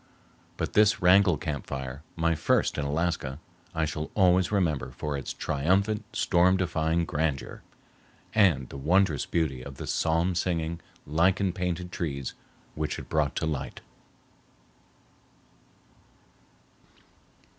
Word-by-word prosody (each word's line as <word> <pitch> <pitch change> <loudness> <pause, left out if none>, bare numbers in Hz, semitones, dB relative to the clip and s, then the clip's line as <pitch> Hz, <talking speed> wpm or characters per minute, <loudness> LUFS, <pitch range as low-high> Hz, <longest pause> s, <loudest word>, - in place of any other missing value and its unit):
But - - -3
this 105 0 +4
Wrangell 90 -1 +5
camp 75 -3 -4
fire, 65 +1 -5
my 85 0 +2
first 75 - +1
in 70 - -1
Alaska, 75 -3 -1 0.4
I 80 -1 +1
shall 75 0 -4
always 90 -1 +4
remember 80 -10 0
for 75 +3 -4
its 70 - -4
triumphant 100 +9 0
storm 90 +1 +3
defying 85 -2 0
grandeur, 75 -4 -2 0.7
and 85 - +3
the - - -8
wondrous 85 +1 +2
beauty 75 -7 -1
of 70 +1 -9
the - - -7
psalm 85 +3 +1
singing, 85 -1 -1 0.3
lichen 90 +5 +2
painted 90 -1 -3
trees 70 -8 -3 0.4
which 75 -1 -3
it - - -9
brought - - +1
to - - -1
light. 75 -4 -4
80 Hz, 120 wpm, -27 LUFS, 75-90 Hz, 0.7 s, Wrangell